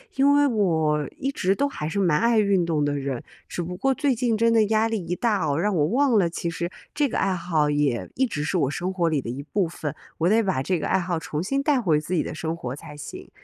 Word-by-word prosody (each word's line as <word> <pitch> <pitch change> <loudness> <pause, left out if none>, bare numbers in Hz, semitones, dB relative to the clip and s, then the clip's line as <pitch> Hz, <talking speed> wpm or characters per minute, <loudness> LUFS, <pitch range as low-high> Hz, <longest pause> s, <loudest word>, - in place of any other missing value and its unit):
因 280 +1 +4
为 290 0 +5
我 160 - +1
一 275 0 -2
直 195 -7 +1
都 280 - +1
还 150 - -5
是 160 - -4
蛮 170 -6 +3
爱 235 -1 +3
运 200 -4 +2
动 160 -3 0
的 145 0 0
人， 135 -3 -3 0.2
只 - - -4
不 180 +1 -5
过 270 +7 +2
最 275 +1 +1
近 235 -2 0
真 230 +1 +3
的 225 -2 +4
压 220 +1 +2
力 225 - -1
一 175 - -2
大 205 -5 +1
啊， 140 - 0
让 205 +5 +1
我 155 -5 +2
忘 255 - +3
了 180 -4 +3
其 170 0 -3
实 170 0 -3 0.2
这 295 -1 +2
个 - - -3
爱 195 - +1
好 165 -4 0
也 145 -5 0
一 265 - +2
直 150 -10 -3
是 170 +5 0
我 135 - +1
生 180 +5 -2
活 180 -3 0
里 155 -4 +1
的 115 - -6
一 130 +4 -4
部 190 +5 0
分， 155 -2 -5 0.2
我 165 - +1
得 225 +2 +4
把 190 -10 0
这 180 +6 0
个 155 - -3
爱 190 - +2
好 175 -1 -2
重 155 -1 -4
新 275 +10 -1
带 285 -2 +3
回 160 -10 +2
自 160 +4 -5
己 170 - +2
的 - - -5
生 160 0 -3
活 125 -5 -5
才 145 +1 -11
行。 145 - -9
180 Hz, 295 characters per minute, -24 LUFS, 155-225 Hz, 0.2 s, 为